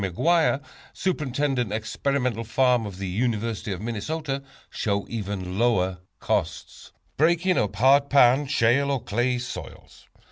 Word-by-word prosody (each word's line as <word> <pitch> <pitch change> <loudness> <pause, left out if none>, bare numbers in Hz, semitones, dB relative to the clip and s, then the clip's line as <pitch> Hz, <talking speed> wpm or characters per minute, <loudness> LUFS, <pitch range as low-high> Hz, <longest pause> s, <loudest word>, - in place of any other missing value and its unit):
McGuire, 145 - +1 0.3
Superintendent 140 - -1
Experimental 115 +2 -1
Farm 120 0 +2
of 95 -3 -8
the 95 0 -4
University 110 +1 -2
of 95 -1 -4
Minnesota, 135 +6 -3 0.3
show 100 -1 -1
even 100 -4 -4
lower 95 -6 +1 0.2
costs. - - -3 0.3
Breaking 170 +4 +3
Up 105 -1 -1
Hard 140 +6 +4
Pan, 135 +1 +5
Shale 130 +1 +2
or 135 -3 -1
Clay 120 +4 0
Soils. 125 +1 -9
120 Hz, 120 wpm, -25 LUFS, 105-140 Hz, 0.3 s, Pan